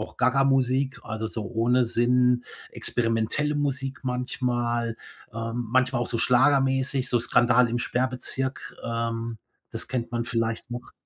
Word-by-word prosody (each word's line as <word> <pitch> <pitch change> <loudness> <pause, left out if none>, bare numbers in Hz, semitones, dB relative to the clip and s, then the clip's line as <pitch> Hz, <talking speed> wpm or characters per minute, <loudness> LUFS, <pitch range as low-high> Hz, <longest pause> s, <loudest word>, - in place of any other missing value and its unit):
auch 105 - -7
Gagamusik, 130 0 +2
also 110 0 -4
so 110 0 -4
ohne 120 +2 +3
Sinn, 125 +1 +2 0.3
experimentelle 115 +6 0
Musik 135 -2 -2
manchmal, 120 -2 -1 0.4
ähm, 115 +1 -3
manchmal 130 +1 +2
auch 120 - -1
so 120 - -2
schlagermäßig, 135 +1 +2
so 120 - +3
Skandal 120 0 +4
im 115 - -1
Sperrbezirk, 130 +2 -2
ähm, 115 0 -3 0.3
das - - -5
kennt 120 -2 -3
man 120 0 -1
vielleicht 115 0 -2
noch. 120 0 -7
125 Hz, 130 wpm, -26 LUFS, 115-130 Hz, 0.4 s, Skandal